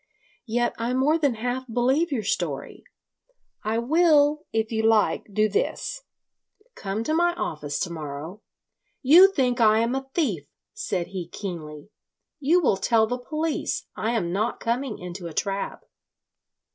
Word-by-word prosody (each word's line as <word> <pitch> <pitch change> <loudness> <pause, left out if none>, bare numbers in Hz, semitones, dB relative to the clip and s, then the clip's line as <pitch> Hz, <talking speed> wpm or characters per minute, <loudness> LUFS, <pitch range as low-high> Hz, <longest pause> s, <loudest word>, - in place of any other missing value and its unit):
Yet 240 +1 0
I 235 +2 -1
more 295 +5 +3
than 285 -6 +1
half 245 +2 -3
believe 265 +8 +2
your 240 -6 -1
story. 165 -8 -3 0.8
I 220 +2 0
will, 300 +3 +3
if 220 0 -1
you 220 -1 0
like, 220 -1 +2
do 215 +2 +2
this: - - -2 0.7
come 200 - -4
to 310 - -1
my 345 +1 +2
office 150 - -3
to 175 - -2
morrow... 155 +5 -7 0.3
." - - -49
"You 380 +3 +9
think 250 -8 +1
I 215 -1 +5
am 230 +2 +1
a 270 0 -4
thief!" 200 - 0 0.3
said 180 -3 -3
he 185 -3 -5
keenly. 170 -3 -7 0.5
"You 310 +6 +3
will 235 - +2
tell 220 +3 +3
the 245 +3 -3
police. 310 +5 -2
I 225 +2 -1
am 180 -7 -1
not 215 +5 -1
coming 235 0 -2
into 180 0 -7
a 160 - -9
trap." 195 0 -2
230 Hz, 155 wpm, -25 LUFS, 195-270 Hz, 0.8 s, You